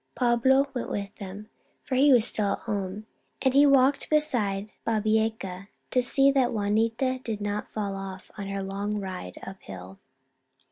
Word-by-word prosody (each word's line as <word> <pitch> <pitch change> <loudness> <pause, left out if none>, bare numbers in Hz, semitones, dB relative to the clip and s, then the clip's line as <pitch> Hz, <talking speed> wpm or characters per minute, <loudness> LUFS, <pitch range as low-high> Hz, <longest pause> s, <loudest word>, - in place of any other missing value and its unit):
Pablo 260 +3 +3
went 245 - -4
with 200 0 -4
them, 200 +1 -8 0.4
for 260 - -6
he 275 +3 +5
was 240 -4 +6
still 210 -4 0
at - - -5
home, 205 -1 -4 0.4
and 265 -1 +3
he 285 +1 +6
walked 275 0 +3
beside 220 -10 +2
Babieca 215 -3 -1 0.2
to 255 - +3
see 275 +3 +4
that 265 -3 +2
Juanita 225 +5 0
did 220 -3 -3
not 205 0 -3
fall 200 -2 -3
off, 190 -1 -8
on 200 -1 -6
her 195 0 -3
long 200 +2 -3
ride 185 - -6
up 190 0 -9
hill. 95 0 -10
215 Hz, 160 wpm, -27 LUFS, 195-255 Hz, 0.4 s, was